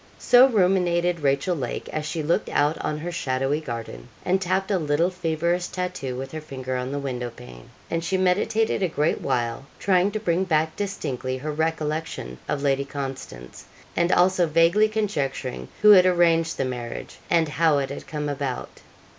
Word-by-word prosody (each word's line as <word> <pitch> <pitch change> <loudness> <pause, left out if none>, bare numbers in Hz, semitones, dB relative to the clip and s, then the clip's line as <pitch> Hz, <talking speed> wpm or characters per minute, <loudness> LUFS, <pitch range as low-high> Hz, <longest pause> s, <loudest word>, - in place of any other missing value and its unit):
So 250 +1 +6
ruminated 180 -5 +2
Rachel 140 +5 +1
Lake 130 -6 -4
as 155 -1 -3
she 155 0 -3
looked 165 +3 0
out 145 +2 +2
on 150 - -2
her 170 +3 -5
shadowy 135 -2 -1
garden, 115 - -7 0.2
and 185 +1 +2
tapped 190 +2 0
a 190 - +2
little 160 +3 +1
feverish 170 0 -1
tattoo 180 -8 -4
with 135 +1 -6
her 155 - -5
finger 130 -4 -5
on 125 +1 -3
the 140 - -2
window 125 -3 -3
pane; 115 - -13 0.2
and 165 0 -2
she 190 +2 0
meditated 195 +4 +1
a 185 - +2
great 155 -1 0
while, 120 +2 -2
trying 185 0 +3
to 215 - -1
bring 180 -3 +1
back 160 -3 +1
distinctly 140 -10 -3
her 150 +4 -4
recollection 155 - -3
of 140 - -1
Lady 140 -1 +2
Constance, 135 - -7 0.3
and 170 +1 +2
also 180 -1 +4
vaguely 165 +7 +4
conjecturing 145 - -2 0.2
who 210 - +9
had 185 -2 +8
arranged 165 -2 +3
the 135 - 0
marriage, 125 -2 -6
and 165 -2 +3
how 160 -1 +3
it 135 -1 -2
had 140 - -7
come 150 -1 -3
about. 140 -3 -4
160 Hz, 175 wpm, -24 LUFS, 135-180 Hz, 0.3 s, who